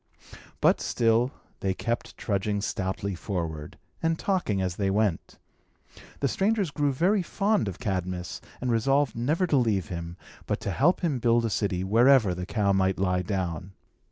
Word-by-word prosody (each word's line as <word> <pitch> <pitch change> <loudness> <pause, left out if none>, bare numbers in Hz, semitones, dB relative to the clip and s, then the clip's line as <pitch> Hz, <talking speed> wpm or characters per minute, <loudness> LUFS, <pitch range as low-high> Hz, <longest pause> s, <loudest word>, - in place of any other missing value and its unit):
But - - +4
still 115 +2 +2 0.3
they 95 -1 -1
kept 120 +3 -3
trudging 100 0 -1
stoutly 100 0 -2
forward, 85 -5 -4 0.2
and 165 0 +1
talking 180 - 0
as 90 -2 -2
they 100 -2 +1
went. 100 -4 0 0.8
The 140 - +3
strangers 195 - +1
grew 145 -1 +1
very 185 +9 +2
fond 200 - 0
of 95 - -4
Cadmus, 90 -5 -3 0.2
and 125 -1 -1
resolved 135 +5 +2
never 150 +10 +1
to 160 -5 +2
leave 105 - +1
him, 85 0 -6 0.3
but - - -1
to - - -2
help 170 +6 +2
him 155 -8 0
build 115 0 +3
a 115 - -1
city 95 -4 0
wherever 115 0 +5
the 90 +1 -5
cow 100 -3 +1
might 95 -1 +2
lie 90 -1 +1
down. 90 -1 -3
105 Hz, 160 wpm, -27 LUFS, 95-135 Hz, 0.8 s, wherever